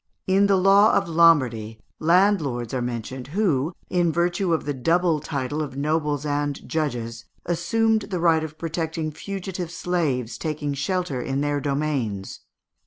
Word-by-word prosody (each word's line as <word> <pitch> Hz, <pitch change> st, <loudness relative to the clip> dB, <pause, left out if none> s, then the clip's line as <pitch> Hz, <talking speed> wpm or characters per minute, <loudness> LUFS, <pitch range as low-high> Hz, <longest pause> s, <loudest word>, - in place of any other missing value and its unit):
In 195 Hz, +2 st, +3 dB
the 200 Hz, -, +4 dB
law 195 Hz, +3 st, +5 dB
of 195 Hz, -, +1 dB
Lombardy 130 Hz, -10 st, +3 dB, 0.2 s
landlords 160 Hz, -, +2 dB
are 130 Hz, -, -1 dB
mentioned 125 Hz, +1 st, -5 dB
who, 160 Hz, -8 st, +1 dB, 0.2 s
in 175 Hz, -2 st, +1 dB
virtue 175 Hz, +2 st, 0 dB
of 165 Hz, -, 0 dB
the 145 Hz, -, -1 dB
double 165 Hz, +4 st, +2 dB
title 145 Hz, +1 st, -3 dB
of 135 Hz, -3 st, -5 dB
nobles 150 Hz, 0 st, 0 dB
and 145 Hz, -1 st, -2 dB
judges, 120 Hz, -7 st, -3 dB, 0.2 s
assumed 220 Hz, +6 st, +1 dB
the 185 Hz, -3 st, -2 dB
right 165 Hz, -2 st, +3 dB
of 155 Hz, 0 st, -7 dB
protecting 160 Hz, -1 st, -3 dB
fugitive 185 Hz, 0 st, -5 dB
slaves 160 Hz, -9 st, -2 dB
taking 150 Hz, -2 st, -2 dB
shelter 140 Hz, -1 st, -2 dB
in 135 Hz, +2 st, -2 dB
their 145 Hz, 0 st, 0 dB
domains. 135 Hz, -9 st, -2 dB
155 Hz, 145 wpm, -24 LUFS, 135-175 Hz, 0.2 s, law